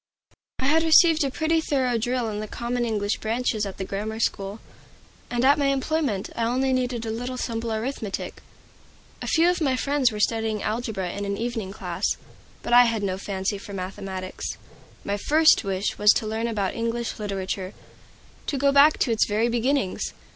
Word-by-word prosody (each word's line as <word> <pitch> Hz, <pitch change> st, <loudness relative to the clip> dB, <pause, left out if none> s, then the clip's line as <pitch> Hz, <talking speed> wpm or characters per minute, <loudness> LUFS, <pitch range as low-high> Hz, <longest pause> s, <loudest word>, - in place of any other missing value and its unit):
I 260 Hz, -, -2 dB
had 310 Hz, +4 st, +4 dB
received 325 Hz, 0 st, +6 dB
a 275 Hz, -, 0 dB
pretty 320 Hz, +4 st, +1 dB
thorough 260 Hz, -6 st, 0 dB
drill 245 Hz, +1 st, -1 dB
in 210 Hz, -1 st, -3 dB
the 215 Hz, -, -4 dB
common 240 Hz, +2 st, -2 dB
English 210 Hz, -2 st, -1 dB
branches 220 Hz, -2 st, -1 dB
at 195 Hz, -, -8 dB
the 190 Hz, -, -4 dB
grammar 215 Hz, +3 st, -4 dB
school, 200 Hz, -1 st, -1 dB, 0.7 s
and 240 Hz, +1 st, 0 dB
at 285 Hz, +2 st, +5 dB
my 280 Hz, -, +2 dB
employment 275 Hz, -6 st, 0 dB
I 230 Hz, -, -1 dB
only 260 Hz, +3 st, +1 dB
needed 250 Hz, -2 st, -1 dB
a 220 Hz, -, -2 dB
little 245 Hz, +3 st, -4 dB
simple 230 Hz, -2 st, -3 dB
arithmetic. 220 Hz, -2 st, -4 dB, 0.8 s
A -, -, -5 dB
few 330 Hz, +1 st, +4 dB
of 355 Hz, -1 st, +1 dB
my 270 Hz, -4 st, +2 dB
friends 275 Hz, -1 st, +1 dB
were 210 Hz, -, -5 dB
studying 220 Hz, -1 st, 0 dB
algebra 215 Hz, -5 st, -2 dB
in 200 Hz, -, -4 dB
an 200 Hz, 0 st, -2 dB
evening 225 Hz, -4 st, -3 dB
class, 195 Hz, -, -2 dB, 0.5 s
but 240 Hz, -, -2 dB
I 245 Hz, 0 st, +9 dB
had 225 Hz, -3 st, -1 dB
no 190 Hz, -1 st, -1 dB
fancy 195 Hz, 0 st, -2 dB
for 200 Hz, -, -10 dB
mathematics. 190 Hz, 0 st, -5 dB, 0.5 s
My 200 Hz, 0 st, -1 dB
first 310 Hz, +8 st, +4 dB
wish 195 Hz, 0 st, -2 dB
was 210 Hz, 0 st, +5 dB
to -, -, -1 dB
learn 220 Hz, +2 st, -2 dB
about 205 Hz, -5 st, -1 dB
English 230 Hz, 0 st, -3 dB
Literature, 195 Hz, -2 st, -4 dB, 0.7 s
to 285 Hz, -, -1 dB
go 280 Hz, +1 st, +3 dB
back 285 Hz, +2 st, +6 dB
to 245 Hz, -, +2 dB
its 225 Hz, -, +2 dB
very 220 Hz, +3 st, +1 dB
beginnings. 240 Hz, -2 st, 0 dB
230 Hz, 185 wpm, -25 LUFS, 205-260 Hz, 0.8 s, I